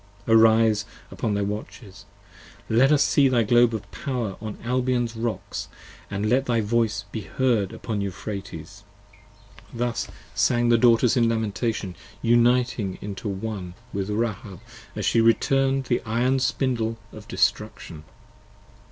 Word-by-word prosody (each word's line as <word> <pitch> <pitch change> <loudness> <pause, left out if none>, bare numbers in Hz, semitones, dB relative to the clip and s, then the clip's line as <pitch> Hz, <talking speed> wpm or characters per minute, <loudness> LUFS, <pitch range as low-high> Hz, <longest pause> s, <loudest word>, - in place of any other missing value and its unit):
Arise 110 -1 +5 0.3
upon 105 -3 -2
thy 100 - 0
Watches, 100 0 -7 0.6
let 125 +6 +4
us 150 -1 +5
see 140 -1 +4
thy 125 -3 +2
Globe 120 +2 +4
of 110 - -5
fire 125 -8 -3
25 - - -26
On 110 -1 -5
Albion's 125 -1 0
Rocks 115 0 -4 0.2
& - - -22
let 110 +7 0
thy 120 -2 +2
voice 110 -1 0
be 110 - -4
heard 115 -8 0
upon 105 -3 -4
Euphrates. 100 -1 -7 0.9
Thus 120 -1 -2 0.3
sang 120 -1 +2
the 115 -1 +4
Daughters 120 0 +4
in 120 -2 +3
lamentation, 110 -3 -2 0.3
uniting 120 -4 +2
into 105 +2 -5
One 95 -3 -5 0.2
With 100 0 -3
Rahab 105 -3 -3 0.4
as - - -3
she 115 - +3
turn'd 135 0 +1
the 125 -2 0
iron 120 +4 +1
Spindle 120 -3 -1 0.2
of 105 -1 -11
destruction. 75 -2 -1
115 Hz, 135 wpm, -24 LUFS, 105-120 Hz, 0.9 s, Arise